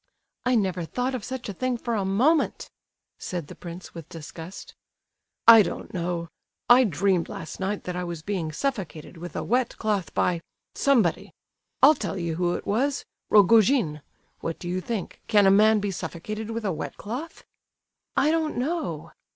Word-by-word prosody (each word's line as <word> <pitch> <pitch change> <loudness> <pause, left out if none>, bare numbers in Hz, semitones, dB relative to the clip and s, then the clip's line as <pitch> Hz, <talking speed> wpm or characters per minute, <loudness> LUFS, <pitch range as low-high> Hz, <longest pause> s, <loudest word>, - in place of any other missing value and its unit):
"I 250 - +4
never 185 -5 0
thought 250 - -2
of 250 -5 -3
such 260 +2 -5
a 200 - -4
thing 255 +5 -1
for 235 0 -3
a 210 -3 0
moment," 255 +12 +2 0.5
said 175 -4 -4
the - - -10
prince, 175 +1 -9
with 165 -2 -9
disgust. 165 +3 -9 0.7
"I 230 -1 +11
don't 185 - -4
know—I 175 +8 +1
dreamed 185 -1 +1
last 160 -2 -7
night 195 +2 -2
that 180 - -4
I 180 - -2
was 170 -3 -5
being 180 -6 -2
suffocated 185 - -4
with 175 +1 -8
a - - -2
wet 250 +1 0
cloth 210 -4 -1
by—somebody. 180 - 0 0.5
I'll 305 - +10
tell 195 - -4
you 170 -3 -2
who 175 0 +1
it - - -6
was—Rogojin! 215 - +3 0.4
What 165 - -4
do 175 - -8
you 180 +1 -1
think, 220 -2 -5
can 205 -3 +5
a 195 - +7
man 215 +2 +5
be 205 -1 -2
suffocated 215 +5 -5
with 225 -1 -4
a 190 - 0
wet - - -6
cloth?" 255 +10 -6 0.7
"I 305 - +4
don't 320 -1 0
know." 270 - -2
200 Hz, 165 wpm, -26 LUFS, 175-240 Hz, 0.7 s, I